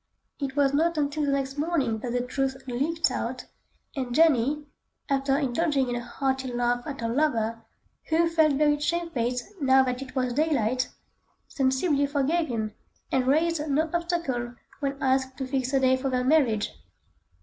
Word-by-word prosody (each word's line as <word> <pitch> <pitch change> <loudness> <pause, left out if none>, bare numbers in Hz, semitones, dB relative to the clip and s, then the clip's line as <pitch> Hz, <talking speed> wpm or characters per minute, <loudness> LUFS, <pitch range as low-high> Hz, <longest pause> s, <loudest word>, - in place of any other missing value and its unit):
It 275 -2 -3
was 280 -1 +3
not 330 +3 +2
until 295 0 0
the - - +2
next 275 0 -2
morning 285 -9 0
that 240 +2 -4
the 245 - +1
truth 265 +1 -1
leaked 285 +7 0
out, - - -3 0.5
and 250 -3 -3
Jenny, 295 -2 +3 0.4
after 275 0 +2
indulging 280 -1 +1
in 245 - -1
a 240 - -3
hearty 265 0 -2
laugh 245 0 0
at 280 -4 -5
her 230 - -1
lover, 230 -4 0 0.4
who 330 +1 +2
felt 320 -3 +3
very 295 +1 +3
shamefaced 290 -7 -1 0.2
now 265 -1 +5
that 250 0 -2
it 260 -1 -9
was 255 -2 0
daylight, 255 -4 +1 0.6
sensibly 280 +2 +1
forgave 300 +4 +1
him, 220 -3 -3 0.4
and 255 -1 +1
raised 320 +3 +2
no 310 +3 +1
obstacle 335 -9 -2 0.2
when 275 -1 -2
asked 260 0 +1
to 265 - -3
fix 260 -1 -1
a 270 - +3
day 260 0 +4
for 265 +1 -2
their 250 -1 0
marriage. 255 -7 +2
270 Hz, 165 wpm, -26 LUFS, 250-300 Hz, 0.6 s, now